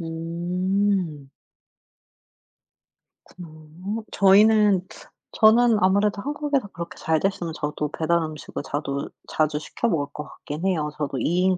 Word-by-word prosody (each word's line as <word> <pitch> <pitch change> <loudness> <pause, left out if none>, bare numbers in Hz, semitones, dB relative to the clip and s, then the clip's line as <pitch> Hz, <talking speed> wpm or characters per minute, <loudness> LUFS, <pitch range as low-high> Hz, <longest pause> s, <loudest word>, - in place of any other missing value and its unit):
음. 175 -1 -2 2.0
그렇구나. 175 -3 -12 0.5
어 - - -9
저희는 200 -1 +5 0.5
저는 225 +1 +5
아무래도 200 +2 +2
한국에서 290 -5 -1
그렇게 170 -3 -8
잘 160 -1 +1
됐으면 175 -4 -2
저도 150 -1 -3
배달 170 +1 +2
음식을 155 -2 -6
자두 140 -1 -3 0.2
자주 155 -1 0
시켜 235 - -3
먹을 145 -6 0
것 150 - -5
같긴 150 +4 -7
해요. 155 -6 0
저도 140 -3 -3
2 175 +2 +1
인 185 -1 +2
175 Hz, 255 characters per minute, -24 LUFS, 155-200 Hz, 2.0 s, 저희는